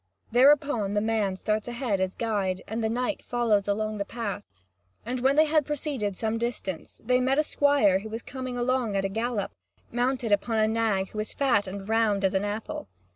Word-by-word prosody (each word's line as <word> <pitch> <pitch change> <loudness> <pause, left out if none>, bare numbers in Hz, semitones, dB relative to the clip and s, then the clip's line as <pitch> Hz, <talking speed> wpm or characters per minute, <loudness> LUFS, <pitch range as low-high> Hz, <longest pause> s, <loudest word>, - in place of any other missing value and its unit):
Thereupon 250 -5 +4
the - - +3
man 215 -3 0
starts 215 +3 -1
ahead 240 -4 -1
as 190 0 -1
guide, 200 -5 -1
and 225 +1 -3
the 220 - +1
knight 250 +6 -2
follows 225 -5 +1
along 215 +1 -1
the - - +1
path. 205 -2 -5 0.6
And 250 +2 -2
when 265 +3 +3
they 310 +1 +6
had 310 0 +3
proceeded 265 -9 -3
some 225 0 -1
distance, 220 -7 -4
they 250 +1 +3
met 265 +2 +2
a 305 - +4
squire 285 -11 +3
who 220 +2 -8
was 225 +1 -5
coming 255 -1 -5
along 245 -3 0
at 195 0 +1
a - - 0
gallop, 225 0 -2 0.4
mounted 245 -1 0
upon 220 +3 +2
a 215 0 +4
nag 220 -4 0
that - - -17
was 215 0 -2
as - - -9
fat 245 -8 +2
and 195 +1 -6
round 220 -3 +2
as 190 0 +2
an 190 +1 +1
apple. 210 +2 -4
225 Hz, 205 wpm, -27 LUFS, 205-250 Hz, 0.6 s, they